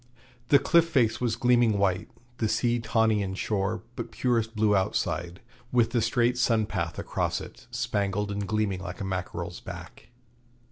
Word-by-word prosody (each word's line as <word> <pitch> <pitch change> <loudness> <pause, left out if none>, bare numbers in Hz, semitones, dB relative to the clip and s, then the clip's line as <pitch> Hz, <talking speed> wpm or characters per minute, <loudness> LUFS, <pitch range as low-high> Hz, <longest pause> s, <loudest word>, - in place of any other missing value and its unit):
The 140 - +7
cliff 165 +4 +3
face 115 -8 +2
was 120 -2 +1
gleaming 120 -3 +3
white, 100 0 0 0.3
the 110 - +1
sea 120 +2 +1
tawny 110 -2 +2
inshore, 100 +1 -2
but 120 - -5
purest 115 -2 0
blue 105 -1 +3
outside, 90 -2 -1 0.3
with 120 -2 +3
the 120 -1 +1
straight 120 +2 +2
sunpath 115 -4 0
across - - -1
it, - - -11
spangled 100 0 -1
and 100 0 -3
gleaming 105 -3 0
like 90 -1 -7
a 100 - -3
mackerel's 90 -2 -4
back. - - -10
110 Hz, 150 wpm, -27 LUFS, 100-120 Hz, 0.3 s, The